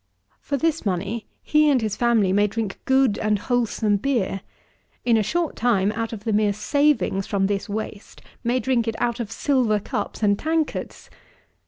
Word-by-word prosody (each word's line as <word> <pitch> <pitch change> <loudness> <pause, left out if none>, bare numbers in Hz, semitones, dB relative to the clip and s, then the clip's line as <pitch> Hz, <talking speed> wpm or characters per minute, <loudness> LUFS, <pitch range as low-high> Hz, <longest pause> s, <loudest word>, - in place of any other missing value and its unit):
For 280 - -2
this 325 +2 0
money, 200 +3 -2 0.2
he 305 0 +4
and 275 -3 +4
his 215 -3 -2
family 225 -6 +2
may 205 +1 +3
drink 205 -1 -4
good 265 -5 +3
and 215 -1 +1
wholesome 220 -2 0
beer; 205 -5 -1 0.6
in 235 -2 +4
a 220 - +3
short 330 - -1
time, 210 -4 +2
out 225 +1 -3
of 215 -3 -7
the 220 -1 -1
mere 210 -1 +2
savings 280 -3 +1
from 195 -2 +1
this 200 +2 -2
waste, 210 0 -6 0.2
may 245 +2 +1
drink 240 -1 0
it 225 - -1
out 240 0 0
of 225 -2 -4
silver 245 -6 +1
cups 215 0 -4
and 200 -1 +3
tankards. 320 -1 -2
225 Hz, 175 wpm, -23 LUFS, 205-255 Hz, 0.6 s, he